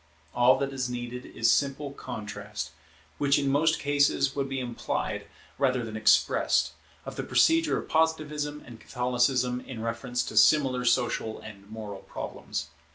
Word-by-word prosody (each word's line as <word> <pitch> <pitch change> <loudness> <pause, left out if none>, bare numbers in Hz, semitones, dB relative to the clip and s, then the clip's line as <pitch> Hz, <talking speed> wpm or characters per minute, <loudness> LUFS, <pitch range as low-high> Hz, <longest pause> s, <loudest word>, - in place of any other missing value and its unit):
All 125 +1 +5
that 140 0 -2
is 130 -2 -2
needed 125 0 -5
is 115 - +2
simple 140 0 0
contrast, 105 - -6 0.5
which 140 -1 +3
in 140 -1 0
most 160 +3 +3
cases 140 -1 +2
would 135 -1 -1
be 135 -1 -2
implied 120 -2 -3 0.3
rather 130 -3 +1
than 110 -1 -7
expressed, 110 - +3 0.3
of - - -7
the - - -2
procedure 325 -1 +3
of - - -5
Positivism 150 -2 0
and 120 -2 -11
Catholicism 125 0 0
in 130 -4 -8
reference 115 +2 -2
to - - -6
similar 130 +2 +5
social 120 -3 +1
and 100 -2 -12
moral 105 -3 -7
problems. - - -6
125 Hz, 150 wpm, -28 LUFS, 115-140 Hz, 0.5 s, All